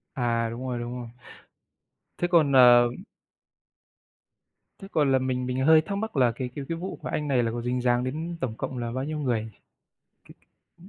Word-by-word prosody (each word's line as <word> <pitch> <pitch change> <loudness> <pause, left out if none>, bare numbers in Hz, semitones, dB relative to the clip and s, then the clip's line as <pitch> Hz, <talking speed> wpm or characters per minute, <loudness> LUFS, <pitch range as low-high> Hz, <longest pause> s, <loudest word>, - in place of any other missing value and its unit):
À, 115 -2 0
đúng 125 +3 -6
rồi, 120 -1 -3
đúng 120 0 -5
rồi. 120 -1 -7 1.1
Thế 175 - 0
còn, 155 -5 +4
ờ 120 -2 +7 1.9
thế 195 - -8
còn 145 -3 +2
là 130 - +4
mình 125 -1 -2
mình 130 +1 -1
hơi 160 0 +7
thắc 200 +5 -4
mắc 220 -7 -4
là 125 -3 +4
cái 125 -1 -4
cái 140 -2 -5
cái 165 - -2
vụ 185 +3 -6
mà - - -4
anh 150 - -2
này 130 -4 +2
là 115 - -1
có 120 - -4
dính 125 +1 -2
dáng 120 0 +2
đến 160 +6 -4
tổng 120 -4 -3
cộng 130 - -5
là 120 -1 -3
bao 130 +2 -3
nhiêu 155 +1 -4
người 115 -6 -2 1.1
nhỉ? 175 +2 -20
130 Hz, 200 wpm, -26 LUFS, 120-150 Hz, 1.9 s, ờ